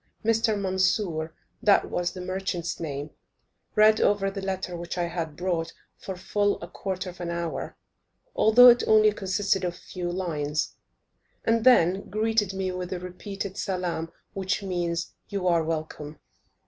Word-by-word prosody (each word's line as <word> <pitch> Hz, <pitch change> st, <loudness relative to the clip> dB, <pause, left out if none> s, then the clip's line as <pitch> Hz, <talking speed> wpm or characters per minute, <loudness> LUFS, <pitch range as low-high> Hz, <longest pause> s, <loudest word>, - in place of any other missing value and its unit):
Mr. 225 Hz, -1 st, +2 dB
Mansur, 185 Hz, -4 st, 0 dB, 0.3 s
that 210 Hz, -4 st, +4 dB
was 175 Hz, 0 st, 0 dB
the 185 Hz, -, -7 dB
merchant's 185 Hz, -2 st, -3 dB
name, 145 Hz, -2 st, -4 dB, 0.6 s
read 215 Hz, +1 st, +6 dB
over 195 Hz, -1 st, +2 dB
the 195 Hz, 0 st, -5 dB
letter 190 Hz, -2 st, -3 dB
which 170 Hz, +1 st, -5 dB
I 175 Hz, -, +1 dB
had 170 Hz, -3 st, -3 dB
brought, 170 Hz, -2 st, -1 dB, 0.2 s
for 190 Hz, -, -7 dB
full 205 Hz, +3 st, 0 dB
a 170 Hz, -, -7 dB
quarter 185 Hz, 0 st, -4 dB
of 180 Hz, -, -13 dB
an 170 Hz, -, -3 dB
hour, 170 Hz, -1 st, -4 dB, 0.6 s
although 245 Hz, +3 st, +8 dB
it 240 Hz, 0 st, +6 dB
only 215 Hz, -1 st, +6 dB
consisted 195 Hz, -1 st, 0 dB
of 175 Hz, -1 st, -2 dB
a -, -, -14 dB
few 175 Hz, -1 st, -5 dB
lines, 155 Hz, -5 st, -2 dB, 0.7 s
and 225 Hz, 0 st, +2 dB
then 195 Hz, -6 st, +4 dB
greeted 215 Hz, -1 st, +1 dB
me 190 Hz, -1 st, -2 dB
with 180 Hz, 0 st, -5 dB
a 185 Hz, -, -2 dB
repeated 190 Hz, +2 st, -6 dB
salaam, 175 Hz, -3 st, -2 dB, 0.2 s
which 190 Hz, +1 st, -1 dB
means 175 Hz, -3 st, -2 dB, 0.2 s
"you 195 Hz, -3 st, -2 dB
are 170 Hz, -2 st, +3 dB
welcome." 155 Hz, -1 st, -4 dB
185 Hz, 155 wpm, -26 LUFS, 170-200 Hz, 0.7 s, although